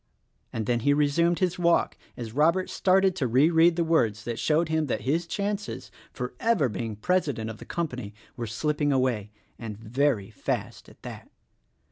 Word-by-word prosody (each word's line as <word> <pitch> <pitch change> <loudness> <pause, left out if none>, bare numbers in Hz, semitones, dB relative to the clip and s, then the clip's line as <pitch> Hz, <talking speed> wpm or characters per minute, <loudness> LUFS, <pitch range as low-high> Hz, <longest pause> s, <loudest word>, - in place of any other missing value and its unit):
and 110 -1 -3
then 120 +1 +1
he 145 +5 +2
resumed 165 +4 +2
his 180 -1 0
walk 170 -1 +2 0.2
as 115 -3 -6
Robert 165 +7 +2
started 190 0 +3
to 135 -8 0
re 135 +8 +4
read 165 +1 +5
the 170 - +1
words 115 -11 +1
that 120 -1 -4
showed 160 +2 +2
him 160 -1 0
that - - -2
his 165 +6 0
chances 205 +2 -3 0.2
for 125 0 -5
ever 225 - +2
being 110 0 -4
president 120 - -1
of 110 - -11
the - - -10
company 125 - -4 0.2
were 120 -2 -4
slip 150 +7 -2
ping 145 -1 +2
away 125 -6 0 0.2
— - - -39
and 110 -3 -6
very 115 -1 0
fast - - -4
at - - -20
that. - - -9
145 Hz, 185 wpm, -26 LUFS, 115-170 Hz, 0.2 s, read